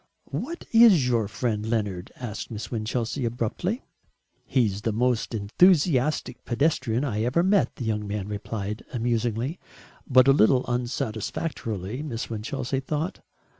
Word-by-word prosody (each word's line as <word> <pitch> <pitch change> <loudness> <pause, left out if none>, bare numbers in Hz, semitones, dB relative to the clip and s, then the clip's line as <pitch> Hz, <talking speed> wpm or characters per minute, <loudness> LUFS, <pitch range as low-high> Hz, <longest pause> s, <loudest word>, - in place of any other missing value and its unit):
"What 335 +6 -4
is 220 - +7
your 115 -4 +1
friend 110 0 -2
Leonard?" 105 -5 -2
asked 115 -4 -6
Miss 110 -1 -6
Winchelsea 115 +3 -2
abruptly. 120 - -2 0.6
"He's 105 -6 +1
the 115 - 0
most 120 +1 0
enthusiastic 150 - +2
pedestrian 130 -2 +1
I 110 -7 -1
ever 125 +9 +2
met," 195 +1 +2
the 125 - -5
young 105 -2 -1
man 100 -1 -3
replied, 105 0 -4
amusingly, 120 +4 -1 0.5
but 130 0 +6
a 135 - +7
little 125 +1 +4
unsatisfactorily, 120 - -3
Miss 120 -7 -4
Winchelsea 125 +4 -2
thought. 155 +6 -3
120 Hz, 130 wpm, -26 LUFS, 110-140 Hz, 0.6 s, is